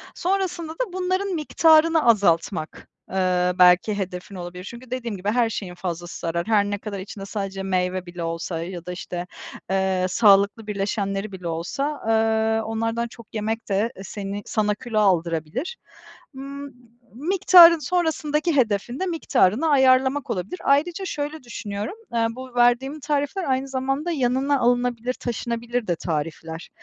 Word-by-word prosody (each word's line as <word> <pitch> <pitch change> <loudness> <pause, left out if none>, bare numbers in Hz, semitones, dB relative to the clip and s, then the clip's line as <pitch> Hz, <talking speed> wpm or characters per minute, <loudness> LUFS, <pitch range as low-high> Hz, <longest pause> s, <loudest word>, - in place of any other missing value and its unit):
Sonrasında 360 -3 -1
da 385 +2 -4
bunların 370 +2 -1
miktarını 320 +1 +4
azaltmak, 175 -7 +1 0.2
eee, 180 -1 +1
belki 180 +3 +5
hedefin 185 0 -5
olabilir. 180 0 -7
Çünkü 235 +5 -10
dediğim 235 -5 -3
gibi 190 +3 -2
her 235 0 +2
şeyin 190 -5 -5
fazlası 175 -1 -5
zarar. 170 +2 -2
Her 210 -2 +3
ne 205 0 -2
kadar 205 -1 -6
içinde 195 +1 -8
sadece 195 -1 -4
meyve 185 -1 -1
bile 175 -1 -7
olsa 165 0 -3
ya 175 -1 -7
da 180 - -5
işte, 180 0 -5 0.4
eee, 190 -1 +1
sağlıklı 200 +1 +4
birleşenleri 200 0 -2
bile 180 -2 -7
olsa, 275 - -3
eee, 220 0 +2
onlardan 225 +1 -2
çok 235 -1 -14
yemek 220 +1 -3
de 205 +4 +1
e 195 - -9
seni 200 +1 -5
sana 210 -1 0
kilo 225 0 -2
aldırabilir. 175 - 0 0.6
Imm, 275 +1 -7
m - - -13 0.4
miktarın 340 +2 +7
sonrasındaki 315 0 0
hedefin 240 -1 0
de 375 - 0
miktarını 310 - +2
ayarlamak 265 0 +3
olabilir. 195 - -3
Ayrıca 330 +7 +2
şöyle 295 -3 -4
düşünüyorum, 210 - -5 0.2
eee, 230 -1 +2
bu 255 +1 -10
verdiğim 245 +5 +2
tarifler 295 +6 -1
aynı 265 -2 0
zamanda 270 +5 -2
yanına 270 0 +1
alınabilir, 245 0 +1
taşınabilir 235 -1 -3
de 175 - +1
tarifler. 160 0 -4
225 Hz, 145 wpm, -23 LUFS, 190-275 Hz, 0.6 s, miktarın